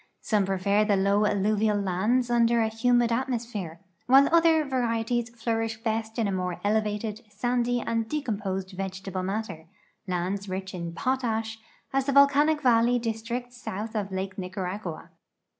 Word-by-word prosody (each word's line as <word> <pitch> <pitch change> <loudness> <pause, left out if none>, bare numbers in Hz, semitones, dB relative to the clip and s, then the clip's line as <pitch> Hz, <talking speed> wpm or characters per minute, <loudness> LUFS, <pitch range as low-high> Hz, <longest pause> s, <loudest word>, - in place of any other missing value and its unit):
Somejirefer 200 0 +1
the 205 - +3
low 200 +2 +3
alluvial 210 +1 +1
lands 215 +6 +1
under 235 0 +3
a 220 -1 +2
humid 240 +1 +2
atmosi)here, 230 -8 -3 0.3
while 270 +2 +7
other 325 -2 +5
varieties 240 -2 -1
flourish 225 -1 -2
best 220 0 -2
in 205 -4 0
more 180 -1 -3
elevated, 210 +1 -1
sandy, 245 +3 0
and 230 -1 -2
decomjHJsed 200 -9 -3
vegetable 190 0 -4
matter 190 -4 -4 0.2
— - - -41
lands 185 +2 -2
rich 190 0 -4
in 170 -2 -5
potash, 225 -1 -1 0.3
as 270 0 +1
the 280 - +1
volcanic 285 +2 +5
valley 240 0 +4
(li.s 225 -2 -3
tricts 245 +1 -5
south 215 +2 -5
of 200 -2 -2
Lake 190 +1 -4
Nicaragua. 185 -1 -5
220 Hz, 140 wpm, -27 LUFS, 195-240 Hz, 0.3 s, while